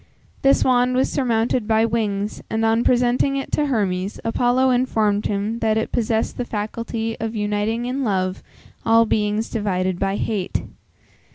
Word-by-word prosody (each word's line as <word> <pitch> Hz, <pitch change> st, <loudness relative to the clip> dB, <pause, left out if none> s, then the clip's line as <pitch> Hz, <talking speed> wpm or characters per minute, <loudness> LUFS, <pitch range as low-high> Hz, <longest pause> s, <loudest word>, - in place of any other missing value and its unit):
This 275 Hz, 0 st, +4 dB
wand 250 Hz, 0 st, +3 dB
was 260 Hz, -, +1 dB
surmounted 235 Hz, -3 st, 0 dB
by 220 Hz, 0 st, +3 dB
wings, 210 Hz, -2 st, -2 dB
and 225 Hz, 0 st, 0 dB
on 225 Hz, +1 st, +2 dB
presenting 250 Hz, +2 st, +2 dB
it 270 Hz, -, -5 dB
to 295 Hz, -, +1 dB
Hermes, 195 Hz, -6 st, -1 dB
Apollo 245 Hz, +3 st, +2 dB
informed 220 Hz, -5 st, +1 dB
him 210 Hz, +3 st, -2 dB
that 220 Hz, -1 st, +1 dB
it 220 Hz, -, -2 dB
possessed 225 Hz, -1 st, 0 dB
the -, -, +1 dB
faculty 225 Hz, +1 st, -4 dB
of 225 Hz, 0 st, -3 dB
uniting 210 Hz, +3 st, -1 dB
in 260 Hz, +2 st, -2 dB
love, 185 Hz, -4 st, -1 dB, 0.4 s
all 230 Hz, 0 st, +5 dB
beings 210 Hz, 0 st, 0 dB
divided 185 Hz, -4 st, -1 dB
by 195 Hz, 0 st, 0 dB
hate. 205 Hz, -3 st, -2 dB
225 Hz, 155 wpm, -21 LUFS, 210-245 Hz, 0.4 s, all